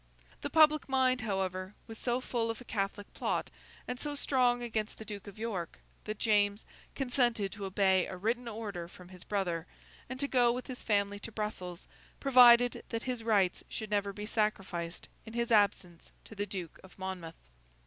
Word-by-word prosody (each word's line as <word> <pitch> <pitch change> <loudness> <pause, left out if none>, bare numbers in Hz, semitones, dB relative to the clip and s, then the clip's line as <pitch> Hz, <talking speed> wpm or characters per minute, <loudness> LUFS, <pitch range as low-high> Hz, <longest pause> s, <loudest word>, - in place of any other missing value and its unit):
The - - -3
public 305 -2 +5
mind, 260 -2 +3
however, 190 -2 -2
was 225 -1 -9
so 245 0 0
full 235 -3 -1
of 225 - -3
a 250 - -11
Catholic 200 -1 -3
plot, - - -1 0.4
and 250 0 -4
so 295 -1 -3
strong 250 -3 +2
against 220 -2 -2
the 220 - -9
Duke 205 -1 -7
of 200 - -10
York, 210 -7 -4 0.3
that 215 0 -3
James 205 -2 +2 0.3
consented 245 -6 +1
to 205 -1 -6
obey 190 -1 +3
a 185 - -6
written 235 +5 -1
order 205 -6 -5
from 180 +1 -14
his 185 -1 -12
brother, 180 -5 -1 0.4
and 260 +1 -5
to 280 - 0
go 245 -3 +4
with 250 +1 -3
his 255 -2 -7
family 205 -1 +1
to 230 - -7
Brussels, 185 -5 -5 0.3
provided 245 -2 +7
that 230 -1 -3
his 250 -3 -3
rights 205 -5 +2
should 215 -2 -5
never 200 -1 +1
be 210 +1 -6
sacrificed 195 -6 -2 0.2
in 220 - -10
his 235 0 -1
absence 200 -5 +2
to - - -11
the 205 -1 -3
Duke 185 -4 -6
of 190 - -16
Monmouth. 185 -4 -5
210 Hz, 180 wpm, -32 LUFS, 195-240 Hz, 0.4 s, provided